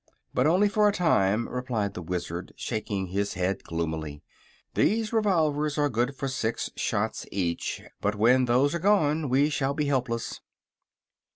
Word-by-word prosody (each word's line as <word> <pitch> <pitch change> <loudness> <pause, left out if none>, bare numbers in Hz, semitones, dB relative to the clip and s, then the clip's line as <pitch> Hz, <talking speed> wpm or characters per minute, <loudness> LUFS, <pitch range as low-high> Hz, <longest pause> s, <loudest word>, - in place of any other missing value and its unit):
"But 125 +3 +3
only 185 +6 +4
for 210 +1 +3
a - - +2
time," 115 - +2
replied 120 -6 -2
the 90 - -6
Wizard, 85 0 -4
shaking 105 -4 -3
his 100 +2 -1
head 90 +2 -1
gloomily. 80 -3 -4 0.5
"These 220 +1 +1
revolvers 155 -9 +1
are 145 -1 +2
good 125 +2 0
for 135 - -3
six 115 -4 -2
shots - - -2
each, 90 -4 -2 0.2
but 105 +1 0
when 125 +5 +4
those 125 +4 +3
are 170 - -1
gone 160 -6 +2
we 140 +4 +3
shall 140 -1 0
be 150 0 0
helpless." 125 -4 -1
125 Hz, 155 wpm, -27 LUFS, 100-150 Hz, 0.5 s, only